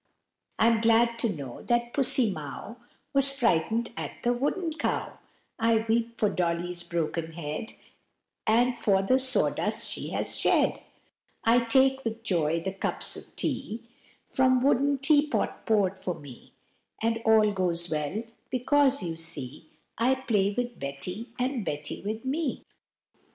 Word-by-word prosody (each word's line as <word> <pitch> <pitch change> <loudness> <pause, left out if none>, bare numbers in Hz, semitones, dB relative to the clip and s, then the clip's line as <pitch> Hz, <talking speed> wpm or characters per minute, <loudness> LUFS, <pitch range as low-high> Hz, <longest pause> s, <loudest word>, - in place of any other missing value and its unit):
I'm 225 0 +3
glad 230 +1 +3
to 230 - +2
know 140 -9 -7
that 240 0 -1
Pussy 260 -4 +4
Mow 155 - -8 0.4
Was 275 0 +6
frightened 230 - 0
at - - -7
the 240 - +2
wooden 310 +7 -2
cow, 320 - -3 0.4
I 225 -1 +2
weep 230 +1 -1
for 210 - +3
Dolly's 175 -1 -2
broken 165 -1 -3
head, 160 +6 -5 0.7
And 240 +3 +3
for 195 -4 +1
the 255 +7 +3
sawdust 260 -1 +4
she - - -5
has - - +2
shed; - - +2 0.6
I 230 +2 +4
take 265 +3 +3
with 225 0 -5
joy 165 -6 0
the 190 +2 -4
cups 195 - +1
of - - -11
tea 225 +2 -3 0.4
From 255 -1 +2
wooden 280 +1 +2
teapot 295 +2 +1
poured 195 -3 +1
for 180 -2 -3
me, 145 -6 -14 0.5
And 225 0 -1
all 220 -1 +4
goes 175 -3 0
well, 155 +8 -2 0.3
because, 275 +2 +2
you 165 -2 -4
see, 155 -3 -2 0.3
I 255 +3 +3
play 205 -6 0
with 245 -1 -3
Betty, 160 - -5
and 250 -2 -2
Betty 150 -3 -4
with 220 +4 -5
me. 285 +2 -2
225 Hz, 140 wpm, -27 LUFS, 175-250 Hz, 0.7 s, Was